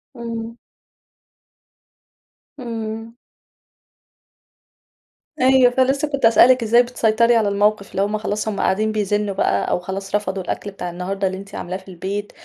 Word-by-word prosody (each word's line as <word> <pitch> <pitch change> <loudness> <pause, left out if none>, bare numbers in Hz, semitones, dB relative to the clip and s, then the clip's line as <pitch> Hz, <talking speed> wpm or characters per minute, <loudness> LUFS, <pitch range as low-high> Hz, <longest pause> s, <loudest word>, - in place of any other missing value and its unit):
امم. 230 -1 -6 2.0
امم. 225 -2 -6 2.2
أيوه، 255 -1 +5
فلسَّه 270 +3 +1
كنت 280 -4 -1
هاسأل 230 +2 +6
لِك 255 -2 +4
إزّاي 235 +2 +5
بتسيطري 235 -1 +2
على 220 -3 +2
الموقف، 205 0 +1
اللي 195 - -1
همّ 205 +2 0
خلاص 215 0 -3
همّ 210 -2 -2
قاعدين 215 +3 +1
بيزنُّوا 205 -1 -1
بقى 100 - 0
أو - - +1
خلاص 195 +2 -5
رفضوا 195 -2 -2
الأكل 205 - -4
بتاع 180 -2 -6
النهارده 190 +3 -3
اللي 190 0 -4
أنتِ 195 +1 -10
عاملاه 180 +1 -4
في 190 - -18
البيت 195 +3 -5
215 Hz, 140 wpm, -20 LUFS, 195-230 Hz, 2.2 s, هاسأل